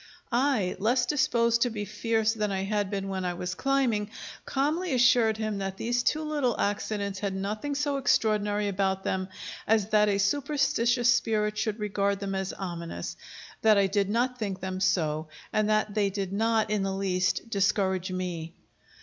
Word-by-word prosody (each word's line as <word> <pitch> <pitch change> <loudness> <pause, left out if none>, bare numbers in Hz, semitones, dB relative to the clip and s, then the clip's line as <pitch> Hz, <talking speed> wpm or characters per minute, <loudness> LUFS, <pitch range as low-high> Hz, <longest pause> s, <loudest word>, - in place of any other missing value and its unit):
I, 240 -6 +1
less 245 +5 +2
disposed 235 -4 +2
to 245 - +3
be 210 -2 -4
fierce 220 +1 0
than 210 -2 -1
I 190 0 -1
had 205 0 -1
been 195 -1 -3
when 190 -1 -3
I 180 -1 -2
was 180 +1 -3
climbing, 240 -3 +1 0.4
calmly 300 +3 0
assured 235 -3 +4
him 215 -2 -2
that 195 0 -4
these 240 +3 0
two 310 +5 +1
little 290 -6 0
accidents 200 -1 -1
had 195 -1 -2
nothing 215 +9 -3
so 285 -1 0
extraordinary 210 -5 +1
about 190 -1 0
them 185 0 -1 0.4
as 215 -2 +2
that 210 0 +4
a 200 - +2
superstitious 245 0 +2
spirit 210 -2 0
should 210 0 -1
regard 200 -2 0
them 200 -1 -3
as 190 0 -2
ominous; 170 -3 -5 0.5
that 215 -2 +5
I 200 - +4
did 195 0 0
not 250 +3 0
think 195 -4 -3
them 185 0 -4
so, 160 -5 +1 0.3
and 215 0 +2
that 215 -1 +1
they 205 -2 +2
did 195 -1 -4
not 220 +1 +1
in 210 -2 +1
the 195 0 -1
least 185 +1 0
discourage 190 -2 +1
me. 175 -3 -4
210 Hz, 175 wpm, -28 LUFS, 195-235 Hz, 0.5 s, that